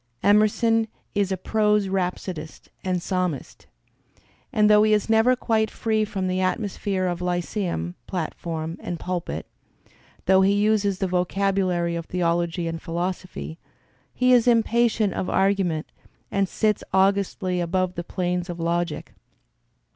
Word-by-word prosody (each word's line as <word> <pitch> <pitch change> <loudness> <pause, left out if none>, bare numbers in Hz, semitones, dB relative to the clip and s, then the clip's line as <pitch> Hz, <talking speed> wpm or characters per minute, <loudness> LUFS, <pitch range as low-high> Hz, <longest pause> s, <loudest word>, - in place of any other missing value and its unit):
Emerson 220 +2 +3 0.3
is 200 -2 0
a 190 - 0
prose 210 +1 +2
rhapsodist 180 -4 -4
and 180 -2 -1
psalmist; 180 -6 -3 0.8
and 210 -1 +4
though 210 0 +6
he 215 0 +4
is 210 +1 +1
never 225 +3 +5
quite 220 -3 +1
free 220 -1 0
from 195 -3 -2
the 185 0 0
atmosphere 190 -1 -1
of 175 -1 -2
lyceum 175 - -2
platform 165 -2 -4
and 175 -2 -5
pulpit, 180 0 -4 0.8
though 190 0 +5
he 195 +1 +4
uses 205 -1 +2
the 190 - -1
vocabulary 180 -1 0
of 165 -1 -5
theol 175 -1 +1
ogy 170 0 -2
and 165 0 -4
philosophy, 175 -1 -4 0.5
he 250 0 +3
is 245 -1 +4
impatient 230 -3 +3
of 185 - -3
argument 190 -5 +1 0.4
and 195 -1 +1
sits 215 -2 0
augustly 190 -1 +1
above 180 +1 0
the 175 - -4
planes 180 0 -2
of 175 0 -5
logic. 170 -1 -2
185 Hz, 135 wpm, -24 LUFS, 175-210 Hz, 0.8 s, though